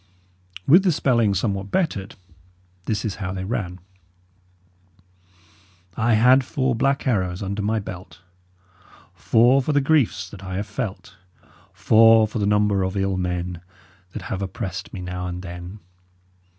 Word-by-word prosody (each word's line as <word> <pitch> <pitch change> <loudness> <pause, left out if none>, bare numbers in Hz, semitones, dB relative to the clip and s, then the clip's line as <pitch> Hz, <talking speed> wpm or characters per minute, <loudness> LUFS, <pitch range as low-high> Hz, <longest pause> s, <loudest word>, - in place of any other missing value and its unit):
With 175 +7 +7
the 185 - +3
spelling 120 -9 +2
somewhat 100 0 -2
bettered, 100 - -2 0.7
this 105 -1 -2
is 105 - -3
how 95 -1 -3
they 95 -1 -4
ran: 95 -3 -4 2.2
"I 115 +1 +1
had 125 +4 +5
four 130 -1 -1
blak 135 +4 0
arrows 95 -7 -1
under 100 +2 -3
my 110 +2 0
belt, 95 -4 -8 0.9
Four 120 +4 +3
for 150 +3 -1
the 145 - +4
greefs 135 - +1
that 100 -2 -11
I 95 -1 -5
have 100 +3 -2
felt, 105 -4 -6 0.5
Four 115 0 +5
for 110 +1 -5
the 100 - 0
nomber 105 -1 +2
of 95 +1 -2
ill 95 0 0
menne 90 -1 -3 0.5
That - - -6
have 95 - -4
opressid 95 -1 -5
me 95 - -7
now 90 0 -5
and 90 0 -6
then. 90 +3 -9
100 Hz, 145 wpm, -22 LUFS, 95-115 Hz, 2.2 s, With